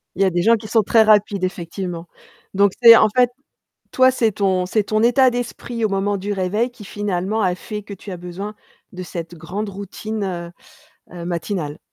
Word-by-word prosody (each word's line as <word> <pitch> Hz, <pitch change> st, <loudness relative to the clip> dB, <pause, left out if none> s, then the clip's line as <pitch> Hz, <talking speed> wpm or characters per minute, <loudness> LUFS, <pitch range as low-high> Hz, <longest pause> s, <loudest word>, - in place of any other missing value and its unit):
Il 195 Hz, -, -3 dB
y -, -, +5 dB
a -, -, +3 dB
des 175 Hz, -1 st, 0 dB
gens 230 Hz, +5 st, +5 dB
qui 215 Hz, -1 st, -7 dB
sont 225 Hz, +1 st, +3 dB
très 220 Hz, +2 st, +4 dB
rapides, 205 Hz, -2 st, +3 dB
effectivement, 175 Hz, -1 st, -4 dB, 0.5 s
donc 200 Hz, 0 st, +3 dB
c'est 230 Hz, -1 st, +10 dB
en 215 Hz, -1 st, +5 dB
fait, 250 Hz, -1 st, +4 dB, 0.6 s
toi, 260 Hz, 0 st, +5 dB
c'est 230 Hz, -4 st, +1 dB
ton 190 Hz, -2 st, +1 dB
c'est 215 Hz, +2 st, +1 dB
ton 215 Hz, +2 st, 0 dB
état 250 Hz, +2 st, +5 dB
d'esprit 240 Hz, -1 st, -4 dB
au 215 Hz, -, +2 dB
moment 200 Hz, +1 st, 0 dB
du 205 Hz, +2 st, -3 dB
réveil, 200 Hz, +5 st, -1 dB
qui 240 Hz, -4 st, -13 dB
finalement 205 Hz, +1 st, -2 dB
a 185 Hz, -3 st, +1 dB
fait 210 Hz, +3 st, -7 dB
que 205 Hz, -, -10 dB
tu 195 Hz, -, -10 dB
as 180 Hz, -, -6 dB
besoin 180 Hz, +4 st, -7 dB, 0.4 s
de 185 Hz, -1 st, -8 dB
cette 170 Hz, -1 st, -7 dB
grande 185 Hz, +6 st, -5 dB
routine, 195 Hz, -3 st, -5 dB, 0.6 s
heu, 175 Hz, -1 st, -7 dB
matinale. 170 Hz, -3 st, -3 dB
200 Hz, 195 wpm, -20 LUFS, 180-220 Hz, 0.6 s, c'est